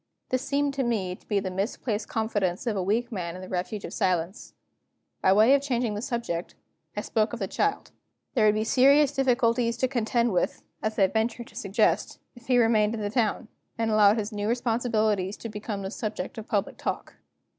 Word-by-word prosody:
This 255 0 0
seemed 280 +1 0
to 270 -1 -1
me 200 -7 -1
to - - -25
be 205 - +1
the 190 -1 -4
misplaced 205 +3 -2
confidence 205 -4 -1
of 230 -3 0
a 195 - 0
weak 225 +6 0
man 175 -5 -4
in 185 - -8
the - - -8
refuge 190 +3 -3
of - - -7
silence. 180 +1 -1 0.7
By 190 - +4
way 215 +7 +6
of 280 - +4
changing 245 -5 -1
the 205 - -4
subject, 235 -9 -3 0.4
I - - 0
spoke 215 0 0
of - - -2
the 195 - -2
child. 415 - -1 0.4
There 220 -5 +4
would 210 - +4
be 215 - +1
serious 275 +5 +5
difficulties 245 -3 +2
to 260 - +1
contend 235 -2 0
with 180 - -1 0.2
(as 215 0 -2
I 195 - +5
ventured 225 +4 -1
to - - -20
suggest), 205 -4 +1 0.2
if 240 -1 -16
he 250 -1 +4
remained 225 -2 +3
in 220 - -5
the 205 -1 -2
town, 225 -1 0 0.3
and 225 -1 0
allowed 210 0 +5
his 215 0 -2
new 205 -1 -3
responsibilities 220 -5 0
to 230 - -7
become 210 -1 -5
the 190 - -4
subject 215 -2 -4
of 220 - -9
public 205 -1 -1
talk. - - -4
220 Hz, 205 wpm, -27 LUFS, 205-240 Hz, 0.7 s, way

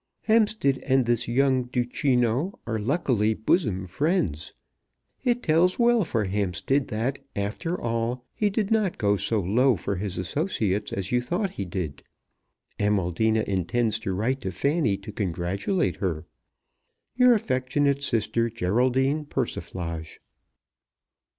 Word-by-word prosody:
Hampstead 215 - +2
and 130 -2 +2
this 120 -1 +1
young 130 +1 +2
Duchino 125 - 0
are 115 -1 -2
luckily 115 -4 +1
bosom 105 - +1
friends. 95 - -1 0.7
It 245 -1 +1
tells 170 +3 +3
well 235 -2 +4
for 115 -9 -1
Hampstead 100 - 0
that, 120 +5 -2 0.2
after 110 - -2
all, 115 +2 -2
he 210 - +1
did 205 0 -1
not 215 -5 +1
go 100 -2 +2
so 110 +2 0
low 120 +7 +3
for 100 +1 -3
his 95 0 -4
associates 105 - -1
as 95 -1 -3
you 125 0 +2
thought 175 - -1
he 100 - -5
did. 85 -6 -4 0.8
Amaldina 105 +2 +1
intends 105 +4 0
to 100 - -3
write 125 +7 -1
to 95 -5 -3
Fanny 140 - +1
to 100 +2 -9
congratulate 100 - -1
her. 85 -5 -2 0.9
Your 250 -1 +6
affectionate 140 - 0
sister, 115 -2 +1
GERALDINE 130 +8 +1
PERSIFLAGE. 85 - -4
120 Hz, 125 wpm, -26 LUFS, 100-145 Hz, 0.9 s, Your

